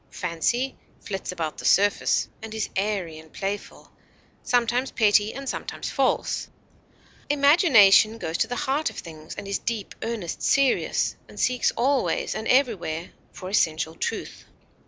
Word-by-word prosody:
Fancy 185 Hz, +10 st, -1 dB, 0.2 s
flits 195 Hz, -2 st, -5 dB
about 165 Hz, -4 st, -4 dB
the -, -, -7 dB
surface, 205 Hz, +1 st, +3 dB
and 220 Hz, 0 st, -7 dB
is 220 Hz, -, -2 dB
airy 190 Hz, -5 st, -2 dB
and 160 Hz, -1 st, -16 dB
playful, 200 Hz, +1 st, -5 dB, 0.5 s
sometimes 245 Hz, +2 st, +1 dB
petty 210 Hz, -1 st, +3 dB
and 275 Hz, +1 st, -8 dB
sometimes -, -, -4 dB
false; -, -, 0 dB, 0.8 s
imagination 275 Hz, -, +6 dB
goes 165 Hz, -6 st, -4 dB
to -, -, +2 dB
the 245 Hz, -, -3 dB
heart 290 Hz, +3 st, 0 dB
of -, -, -13 dB
things, 155 Hz, -1 st, -9 dB
and 200 Hz, -, -7 dB
is 200 Hz, -, -1 dB
deep, 225 Hz, -4 st, -4 dB
earnest, 225 Hz, -7 st, -4 dB
serious, 275 Hz, -2 st, +2 dB
and -, -, -11 dB
seeks 250 Hz, -1 st, +2 dB
always 265 Hz, +2 st, +1 dB
and 220 Hz, -, -4 dB
everywhere 200 Hz, -, +1 dB, 0.2 s
for 185 Hz, -, -9 dB
essential 160 Hz, -4 st, +1 dB
truth. -, -, -5 dB
210 Hz, 140 wpm, -25 LUFS, 180-250 Hz, 0.8 s, imagination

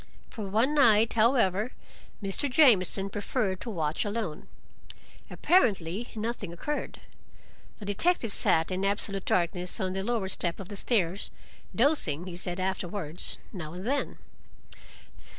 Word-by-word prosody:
For 215 Hz, -4 st, -6 dB
one 230 Hz, +8 st, +2 dB
night, 225 Hz, -6 st, +4 dB
however, 225 Hz, -2 st, +2 dB, 0.5 s
Mr. 195 Hz, +8 st, 0 dB
Jamieson 200 Hz, -, +3 dB
preferred 205 Hz, -2 st, -2 dB
to -, -, -6 dB
watch 160 Hz, -7 st, -1 dB
alone. 205 Hz, -7 st, -4 dB, 0.8 s
Apparently 215 Hz, -, +1 dB
nothing 215 Hz, -4 st, -4 dB
occurred. 295 Hz, -, -5 dB, 0.8 s
The 210 Hz, -, -9 dB
detective 225 Hz, -, +2 dB
sat 160 Hz, +2 st, +2 dB
in 185 Hz, +1 st, -2 dB
absolute 195 Hz, -1 st, -2 dB
darkness 180 Hz, +2 st, 0 dB
on 185 Hz, -2 st, -1 dB
the 190 Hz, -, -2 dB
lower 220 Hz, -1 st, -1 dB
step 175 Hz, -2 st, -1 dB
of 195 Hz, -, -8 dB
the 205 Hz, -, -7 dB
stairs, 195 Hz, -3 st, 0 dB, 0.5 s
dozing, 225 Hz, -, +4 dB
he 180 Hz, -2 st, -7 dB
said 180 Hz, +1 st, -2 dB
afterwards, 185 Hz, -3 st, 0 dB, 0.2 s
now 160 Hz, -5 st, -7 dB
and 180 Hz, +3 st, -7 dB
then. 280 Hz, +4 st, -1 dB
200 Hz, 130 wpm, -28 LUFS, 180-230 Hz, 0.8 s, night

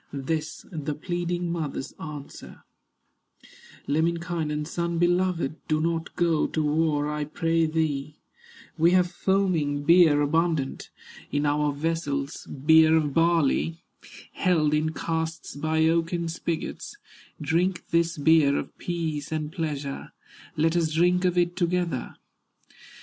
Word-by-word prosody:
This 155 Hz, +3 st, -3 dB
the 150 Hz, -3 st, -3 dB
pleading 175 Hz, +1 st, -2 dB
mother's 155 Hz, -5 st, -4 dB
answer: 150 Hz, -3 st, -9 dB, 1.2 s
"Lemminkainen, 160 Hz, -1 st, -1 dB
son 170 Hz, +1 st, -2 dB
beloved, 175 Hz, -3 st, +1 dB
Do 155 Hz, 0 st, +1 dB
not 165 Hz, +1 st, -2 dB
go 170 Hz, -3 st, +2 dB
to 155 Hz, -, -1 dB
war 150 Hz, -1 st, +1 dB
I 150 Hz, 0 st, -2 dB
pray 165 Hz, +2 st, 0 dB
thee; 150 Hz, -2 st, -1 dB, 0.6 s
We 170 Hz, +2 st, +5 dB
have 180 Hz, -1 st, +3 dB
foaming 175 Hz, -6 st, 0 dB
beer 165 Hz, -2 st, +6 dB
abundant, 155 Hz, -1 st, 0 dB, 0.4 s
In 145 Hz, +1 st, 0 dB
our 145 Hz, 0 st, +1 dB
vessels 145 Hz, -1 st, -3 dB
beer 160 Hz, +3 st, +5 dB
of 150 Hz, -3 st, 0 dB
barley, 165 Hz, 0 st, +2 dB, 0.5 s
Held 160 Hz, -5 st, +2 dB
in 155 Hz, +1 st, +1 dB
casks 160 Hz, -1 st, -3 dB
by 160 Hz, +2 st, +1 dB
oaken 170 Hz, +1 st, 0 dB
spigots; 165 Hz, 0 st, -4 dB, 0.4 s
Drink 170 Hz, +5 st, 0 dB
this 170 Hz, 0 st, +1 dB
beer 145 Hz, -1 st, +4 dB
of -, -, -5 dB
peace 160 Hz, -4 st, -3 dB
and 155 Hz, -1 st, -3 dB
pleasure, 145 Hz, -4 st, -4 dB, 0.4 s
Let 160 Hz, +2 st, +2 dB
us 165 Hz, -2 st, +1 dB
drink 180 Hz, +3 st, +2 dB
of 180 Hz, -1 st, +1 dB
it 175 Hz, 0 st, +2 dB
together." 175 Hz, -5 st, -1 dB
160 Hz, 120 wpm, -26 LUFS, 150-170 Hz, 1.2 s, beer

